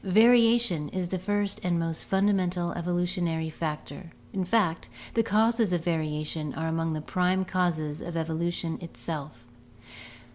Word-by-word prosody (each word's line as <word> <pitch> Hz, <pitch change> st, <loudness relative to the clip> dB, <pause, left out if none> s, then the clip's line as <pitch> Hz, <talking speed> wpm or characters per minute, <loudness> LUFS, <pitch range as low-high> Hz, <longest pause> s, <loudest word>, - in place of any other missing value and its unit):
Variation 225 Hz, -5 st, +5 dB
is 185 Hz, -2 st, -3 dB
the 185 Hz, -, -2 dB
first 205 Hz, +1 st, -1 dB
and 175 Hz, -1 st, +1 dB
most 165 Hz, -1 st, -2 dB
fundamental 185 Hz, -3 st, +1 dB
evolutionary 175 Hz, -2 st, -1 dB
factor, 155 Hz, +1 st, -5 dB, 0.2 s
in 190 Hz, -, 0 dB
fact, 180 Hz, -3 st, +1 dB, 0.2 s
the 230 Hz, -, +3 dB
causes 225 Hz, -1 st, +2 dB
of 170 Hz, -2 st, 0 dB
variation 155 Hz, -2 st, -2 dB
are 160 Hz, 0 st, -2 dB
among 165 Hz, 0 st, -1 dB
the 155 Hz, -, -3 dB
prime 185 Hz, +3 st, +1 dB
causes 165 Hz, -5 st, -1 dB
of 175 Hz, -, -6 dB
evolu 165 Hz, +1 st, -1 dB
tion 165 Hz, -1 st, -3 dB
itself. 150 Hz, -7 st, -6 dB
175 Hz, 140 wpm, -28 LUFS, 160-190 Hz, 0.2 s, Variation